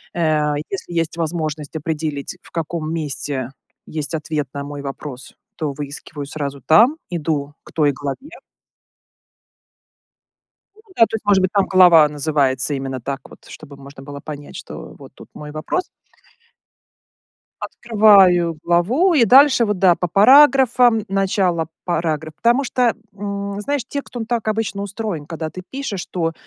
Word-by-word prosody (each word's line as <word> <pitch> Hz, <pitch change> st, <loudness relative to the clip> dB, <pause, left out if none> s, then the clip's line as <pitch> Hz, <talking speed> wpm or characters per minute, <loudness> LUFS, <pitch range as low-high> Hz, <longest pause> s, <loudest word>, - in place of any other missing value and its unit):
Э, 155 Hz, -3 st, +1 dB, 0.2 s
если 180 Hz, -2 st, -5 dB
есть 165 Hz, +1 st, -3 dB
возможность 155 Hz, -2 st, -3 dB
определить, 155 Hz, 0 st, -4 dB
в -, -, -19 dB
каком 160 Hz, -1 st, -4 dB
месте 140 Hz, -4 st, -3 dB, 0.4 s
есть 155 Hz, +1 st, -4 dB
ответ 150 Hz, -2 st, -3 dB
на 140 Hz, 0 st, -5 dB
мой 145 Hz, 0 st, -7 dB
вопрос, 135 Hz, -1 st, -8 dB, 0.2 s
то 150 Hz, -3 st, -3 dB
выискиваю 145 Hz, +1 st, -7 dB
сразу 140 Hz, -2 st, -5 dB
там, 230 Hz, -, +5 dB, 0.2 s
иду 145 Hz, -3 st, -2 dB
к -, -, -15 dB
той 150 Hz, -3 st, +3 dB
главе 145 Hz, -, -7 dB, 2.4 s
Ну 435 Hz, -, -21 dB
да, -, -, +3 dB
то -, -, -10 dB
есть, 220 Hz, -, -4 dB
может 200 Hz, -2 st, +3 dB
быть, 185 Hz, -, 0 dB
там 200 Hz, -2 st, +2 dB
глава 175 Hz, -5 st, +6 dB
называется 145 Hz, -2 st, 0 dB
именно 135 Hz, -1 st, -4 dB
так 135 Hz, +2 st, -4 dB
вот, -, -, -17 dB
чтобы 145 Hz, -2 st, -12 dB
можно 140 Hz, 0 st, -13 dB
было 140 Hz, 0 st, -9 dB
понять, 145 Hz, -1 st, -9 dB
что -, -, -9 dB
вот -, -, -13 dB
тут -, -, -14 dB
мой 150 Hz, 0 st, -9 dB
вопрос. 155 Hz, -, -2 dB, 1.8 s
Открываю 195 Hz, -7 st, +4 dB
главу 230 Hz, -, +2 dB
и 250 Hz, -8 st, +4 dB
дальше, 265 Hz, -3 st, +6 dB
вот, 210 Hz, -2 st, -1 dB
да, 180 Hz, -2 st, +5 dB
по 180 Hz, -, -3 dB
параграфам- 245 Hz, -, +5 dB
начало 190 Hz, -4 st, 0 dB, 0.2 s
парагра 160 Hz, -2 st, -2 dB
потому 240 Hz, -, +2 dB
что, 245 Hz, -2 st, +1 dB, 0.2 s
м, 200 Hz, 0 st, -5 dB
знаешь, 280 Hz, +2 st, -2 dB
текст, 280 Hz, -3 st, -6 dB
он 225 Hz, -, -3 dB
так 230 Hz, -2 st, -2 dB
обычно 215 Hz, -2 st, -2 dB
устроен, 200 Hz, -6 st, -5 dB
когда 160 Hz, -1 st, -5 dB
ты 185 Hz, -, -9 dB
пишешь, 265 Hz, -9 st, -5 dB
то, 165 Hz, -2 st, -2 dB
165 Hz, 145 wpm, -20 LUFS, 150-210 Hz, 2.4 s, глава